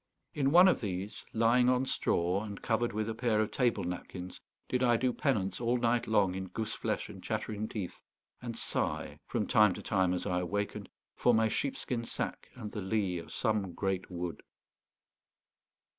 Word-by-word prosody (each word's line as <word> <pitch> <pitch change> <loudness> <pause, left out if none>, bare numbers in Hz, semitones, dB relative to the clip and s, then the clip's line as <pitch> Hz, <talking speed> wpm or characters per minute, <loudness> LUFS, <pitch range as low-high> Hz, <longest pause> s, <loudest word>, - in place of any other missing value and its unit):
In 135 -2 +2
one 175 +5 +8
of 185 - +3
these, 100 -1 -4
lying 120 +2 +4
on 130 +1 +3
straw 90 -5 +1
and 100 -2 -6
covered 120 +1 +1
with 110 +1 -2
a 115 - -1
pair 110 -1 +1
of 110 0 +1
table 120 0 +1
napkins, 90 +1 -6 0.3
did 125 - 0
I 120 -2 +4
do 125 +1 +1
penance 105 -10 0
all 120 +1 +2
night 120 0 +1
long 100 -4 +3
in 95 0 -4
goose 110 +4 -3
flesh - - -2
and - - -11
chattering 110 0 -2
teeth, 100 -6 -5 0.4
and - - -5
sigh, - - -2
from - - -1
time 105 -3 +5
to - - -8
time 95 -3 +2
as 90 - -3
I 90 -3 +1
awakened, 100 +3 -3 0.3
for 120 - +4
my 110 0 +4
sheepskin 125 -2 -2
sack - - -4
and 110 -4 -7
the 105 - -4
lee 95 -2 0
of 85 - -10
some 105 -5 0
great 95 -1 -2
wood. 90 -2 -4
110 Hz, 180 wpm, -32 LUFS, 95-120 Hz, 0.4 s, one